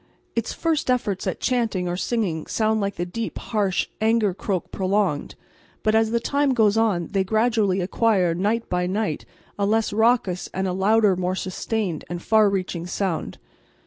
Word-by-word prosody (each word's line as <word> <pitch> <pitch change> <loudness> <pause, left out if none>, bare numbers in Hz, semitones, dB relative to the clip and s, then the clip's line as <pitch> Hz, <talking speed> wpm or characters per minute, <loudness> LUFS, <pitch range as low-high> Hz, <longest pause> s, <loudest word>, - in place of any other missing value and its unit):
Its 230 -1 -1
first 325 -5 -1
efforts 210 -7 0
at - - -2
chanting 225 -8 0
or 175 - -1
singing 185 -6 -2
sounds 220 -1 +1
like 200 0 -2
the 175 - -2
deep, 225 +6 -5
harsh, 200 -5 -1
anger 220 -3 +2
croak 190 -1 -3
prolonged, 190 -5 0 0.5
but 215 - +2
as 220 0 +3
the 235 +1 +1
time 280 +2 +1
goes 215 -3 +4
on 210 -7 +1
they 195 -2 +1
gradually 215 -2 +1
acquire, 185 -2 +2
night 210 +6 0
by 180 0 0
night, 200 -4 -2 0.3
a 200 - +2
less 220 0 +1
raucous 220 -5 +2
and 190 0 0
a 180 - -1
louder, 205 +1 +3
more 180 +1 -1
sustained 190 -2 -3
and 175 0 -5
far 215 -2 +4
reaching 185 -3 -3
sound. 180 -2 -2
205 Hz, 170 wpm, -23 LUFS, 185-225 Hz, 0.5 s, goes